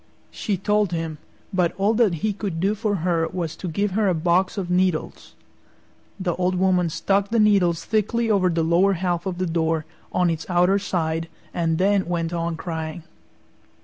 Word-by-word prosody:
She 200 -3 -2
told 205 0 +1
him, 165 -2 -3 0.3
but 180 -2 +1
all 200 +3 +2
that 220 -6 +3
he 215 - +1
could 195 -5 -4
do 195 +4 +2
for 215 -1 -1
her 165 -2 +1
was 170 -4 -4
to 185 - -5
give 200 +5 -1
her 205 +2 +1
a 185 - +2
box 175 +4 +1
of 180 -3 -3
needles. 180 -3 -1 0.8
The 180 -2 -1
Old 180 0 +1
Woman 180 -2 +2
stuck 195 +5 0
the 230 - 0
needles 195 -6 +3
thickly 225 +2 0
over 195 -4 +3
the 165 -1 0
lower 175 +5 +3
half 175 0 -1
of 180 -2 -3
the 185 - -1
door, 160 -2 0 0.3
on 180 -2 +2
its 160 -1 -4
outer 180 +3 +3
side, 165 -4 -2 0.3
and 165 -2 0
then 195 +1 +2
went 170 -1 -2
on 170 -1 -2
crying. 160 -1 -5
180 Hz, 180 wpm, -23 LUFS, 165-200 Hz, 0.8 s, that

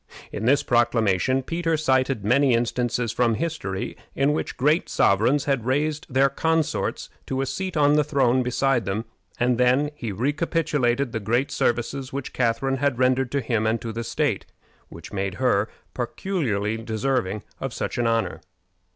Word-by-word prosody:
In 110 - -4
this 140 +3 +4
proclamation 120 +1 +2
Peter 165 +1 -1
cited 130 -6 +1
many 130 +2 +4
instances 120 0 0
from 115 -1 +2
history 105 - -3 0.2
in 140 +2 +2
which - - -3
great 150 +6 +2
sovereigns 120 +9 +3
had 135 -5 0
raised 150 +3 -1
their 135 +2 +4
consorts 160 +3 -1 0.2
to 130 - -2
a - - 0
seat 185 +4 -3
on 145 0 +4
the 150 0 +4
throne 130 -4 +2
beside 125 -1 +1
them, 100 +4 -2 0.3
and 125 0 +2
then 130 +4 +3
he 120 -7 -5
recapitulated 140 - 0
the 110 - -2
great 120 +6 0
services 130 +3 -1
which 140 -1 -5
Catharine 130 +3 0
had 140 -2 0
rendered 130 0 +2
to 140 - +1
him 110 -2 0
and 115 +1 +1
to 115 - -5
the 115 +1 -3
state, - - -1 0.4
which 85 +4 -11
made 95 -2 -2
her 110 -3 +1 0.2
peculiarly 120 - -2
deserving 110 -2 -1 0.2
of 135 - -3
such 120 - -3
an 120 - +2
honor. 115 -1 0
125 Hz, 160 wpm, -24 LUFS, 115-140 Hz, 0.4 s, this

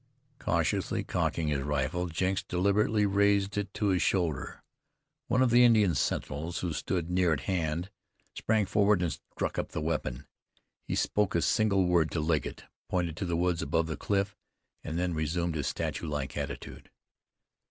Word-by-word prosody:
Cautiously - - 0
cocking 80 -2 -1
his 70 -2 0
rifle, 75 +5 -1
Jenks 95 +3 0
deliberately 105 +3 +2
raised 100 0 +2
it 100 -1 -2
to 105 - +1
his 95 -2 +2
shoulder. 85 -7 -1 0.6
One 125 +2 +3
of 125 - +2
the 120 +1 +7
Indian 110 -7 +5
sentinels 80 +3 -2
who 85 -3 -2
stood 85 +1 -2
near 90 -1 +3
at 70 - -2
hand, 85 +2 -2 0.4
sprang 110 -2 +1
forward 100 -1 +3
and 85 - 0
struck - - -4
up - - -4
the - - -2
weapon. 75 -4 -2 0.6
He - - -1
spoke 105 -3 +1
a 85 - +3
single 105 -5 +3
word 85 -3 +3
to 80 - 0
Legget, 80 0 -1 0.3
pointed 85 -3 -1
to 95 - -2
the 85 -1 -1
woods 90 -1 +1
above 80 0 +1
the 80 -1 -3
cliff, 100 0 -1 0.5
and 80 0 -4
then 90 0 0
resumed 80 +2 -1
his 75 -3 -2
statue 85 - -3
like 75 -3 -3
attitude. - - -6
90 Hz, 165 wpm, -30 LUFS, 80-100 Hz, 0.6 s, the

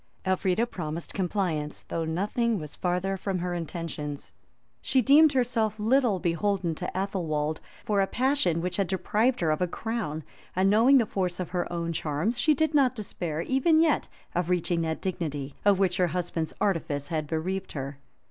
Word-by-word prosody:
Elfrida 190 +3 +2
promised 170 -7 -5
compliance, 175 -6 -1
though 165 -1 -3
nothing 210 +7 0
was 150 -4 -7
farther 180 +2 -1
from 190 0 -2
her 180 0 -2
intentions. 160 - -5 0.5
She 265 - +2
deemed 290 +5 +6
herself 235 -4 +1
little 235 -1 +3
beholden 180 0 0
to 180 +3 -4
Athelwold 160 -6 -1 0.3
for 205 -2 +2
a 195 - +2
passion 250 - +1
which 180 0 -2
had 195 -2 +1
deprived 215 +6 +1
her 160 -2 +2
of 155 - -1
a 180 - +2
crown; 205 -6 -3 0.3
and 190 +2 +3
knowing 240 +6 +6
the 235 - +4
force 185 -3 -2
of 180 -2 -4
her 180 -1 -2
own 170 -1 -2
charms, 160 +10 -1
she 305 +4 +4
did 315 +2 +1
not 270 -3 +4
despair, 175 -7 -4
even 270 - +3
yet, 320 -2 +3 0.3
of 175 0 -1
reaching 175 -1 +1
that 160 -1 -2
dignity, 150 -7 -3
of 205 -1 +5
which 185 -2 +1
her 180 - +3
husband's 170 -1 -3
artifice 150 -7 -1
had 155 -2 -2
bereaved 185 +5 -3
her. 140 0 -5
180 Hz, 175 wpm, -27 LUFS, 165-215 Hz, 0.5 s, deemed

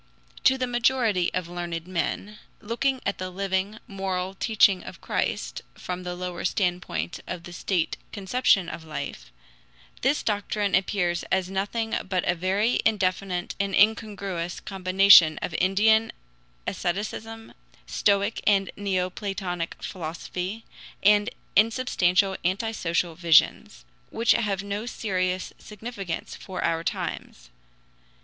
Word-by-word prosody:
To 265 - +6
the 255 - 0
majority 240 -6 +2
of 180 -2 -2
learned 175 0 -5
then, 195 +6 -2 0.2
looking 250 +4 -1
at - - -1
the 185 0 -3
living, 195 +2 -2
moral 190 -3 -3
teaching 200 -2 +3
of - - -10
Christ - - -2
from 180 0 -5
the 180 -1 -5
lower 180 -1 -5
standpoint 175 - -1
of 180 -2 -5
the 175 0 -1 0.2
conception 195 -2 +2
of 170 - -6
life, 155 - -6 0.7
this 275 +4 +2
doctrine 205 -1 -1
appears 180 -2 +1
as 190 0 +1
nothing 215 +4 -1
but 185 -2 0
very 195 +7 +1
indefinite 185 -3 0
and 200 -1 0
incongruous 200 -5 +1
combination 185 -4 +6
of 175 - -3
Indian 220 +4 +4 0.5
asceticism, 215 +5 -4 0.3
Stoic 200 +1 +1
and 195 -2 +3
Neoplatonic 185 -2 -3
philosophy, 180 +4 -5 0.4
and 205 +1 +5 0.3
insubstantial 200 -4 +3
anti 190 +6 0
social 170 -4 -1
visions, 170 +5 +3 0.2
which 230 0 +2
have 200 -4 +1
no 205 +3 -4
serious 185 -5 -2
significance 210 -5 -6
for 190 - -6
our 165 0 0
times. - - -5
195 Hz, 115 wpm, -26 LUFS, 180-210 Hz, 0.7 s, To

